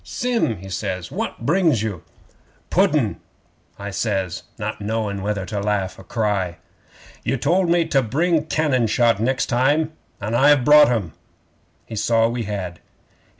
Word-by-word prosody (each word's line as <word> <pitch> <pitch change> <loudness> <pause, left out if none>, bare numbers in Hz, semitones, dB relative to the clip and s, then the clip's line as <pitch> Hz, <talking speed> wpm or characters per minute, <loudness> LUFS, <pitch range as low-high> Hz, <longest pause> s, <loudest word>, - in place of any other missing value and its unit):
"Sim," 235 - -1
he 95 +2 -10
says, 95 -1 -4
"what 115 - -4
brings 160 - +2
you?" 100 -7 -4 0.7
'"Pudden," - - +2 0.6
I 100 0 -6
says, 95 -4 -2 0.2
not 105 0 -4
knowing 105 -2 -2
whether 100 -1 -2
to 105 +1 -4
laugh 100 -2 -1
or - - -11
cry. 100 -7 -1 0.7
'"You 135 - 0
told 170 +8 +1
me 170 -1 +3
to 135 - +3
bring 155 +6 0
cannon 140 -8 +1
shot 115 -1 +2
next 130 +4 +1
time, 145 +6 +1 0.3
an' 105 +3 -4
I've 135 +1 +5
brought 150 -1 +7
'em." 105 -10 -1 0.7
'He 115 - -8
saw 115 +1 +2
we 120 -1 -3
had. 95 -5 -5
115 Hz, 150 wpm, -21 LUFS, 100-145 Hz, 0.7 s, brought